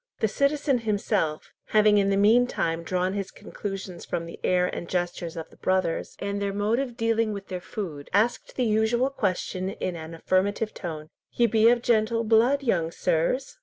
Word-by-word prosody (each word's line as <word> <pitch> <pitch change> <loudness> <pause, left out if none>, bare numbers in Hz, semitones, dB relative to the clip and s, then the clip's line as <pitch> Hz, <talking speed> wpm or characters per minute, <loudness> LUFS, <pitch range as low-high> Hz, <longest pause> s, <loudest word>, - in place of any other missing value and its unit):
The 220 - +2
citizen 280 +3 +1
himself, 205 -7 -1
having 210 -1 +4
in 195 0 +2
the 195 - +2
meantime 205 -6 +3
drawn 180 +3 -1
his 200 -1 -3
conclusions 195 -3 -7
from 170 - -3
the 170 - -10
air 180 0 +3
and 175 -1 -5
gestures 175 -2 -2
of 160 - -7
the - - -18
brothers, 185 -3 -1
and 200 0 -3
their 200 -1 -1
mode 210 +4 +1
of 250 -4 -4
dealing 225 -1 +1
with 200 -1 -8
their 180 -1 -4
food, 165 -8 -6
asked 220 +5 +1
the 250 - +1
usual 225 +4 +2
question 185 -5 -2
in 185 -2 -4
an 160 0 -7
affirmative 200 +6 0
tone, 155 -3 -6 0.2
"Ye 240 - +3
be 225 0 +5
of 240 0 +2
gentle 230 0 +2
blood, 235 +6 +3
young 170 -10 +1
sirs?" 170 - -1
200 Hz, 180 wpm, -26 LUFS, 180-230 Hz, 0.2 s, be